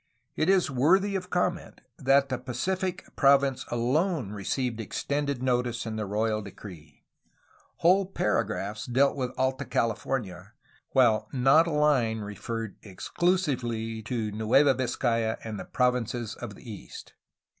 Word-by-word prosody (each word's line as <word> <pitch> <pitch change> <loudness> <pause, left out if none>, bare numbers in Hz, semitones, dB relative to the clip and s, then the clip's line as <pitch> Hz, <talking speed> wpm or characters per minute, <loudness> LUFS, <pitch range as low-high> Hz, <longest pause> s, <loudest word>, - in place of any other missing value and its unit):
It 160 - +1
is 190 -6 +3
worthy 190 +10 +3
of 185 -1 -3
comment 180 0 -2 0.2
that 140 0 +3
the 130 - -2
Pacific 180 +9 -3
province 135 -2 +3
alone 130 - 0
received 115 +4 -2
extended 140 +5 -2
notice 125 -2 0
in 110 -1 -4
the 110 -2 -3
royal 110 +1 0
decree. 90 -6 -12 0.7
Whole 185 +3 +3
paragraphs 105 - -1
dealt 135 +3 +3
with 130 -3 -2
Alta 130 +1 0
CaUfornia, 110 -5 -2 0.4
while 120 -5 +3
not 135 +5 +4
a - - 0
Hne 135 -8 +2
referred 110 +1 -6
exclu 175 - 0
sively 120 -8 -3
to 110 -1 -3
Nueva 115 +7 +4
Viz 130 -1 -2
cay 115 -3 +1
a 110 0 -1
and 110 -3 -5
the 95 - -6
provinces 125 -2 0
of 120 -5 -8
the - - -15
east. 105 -3 -10
125 Hz, 140 wpm, -27 LUFS, 110-140 Hz, 0.7 s, not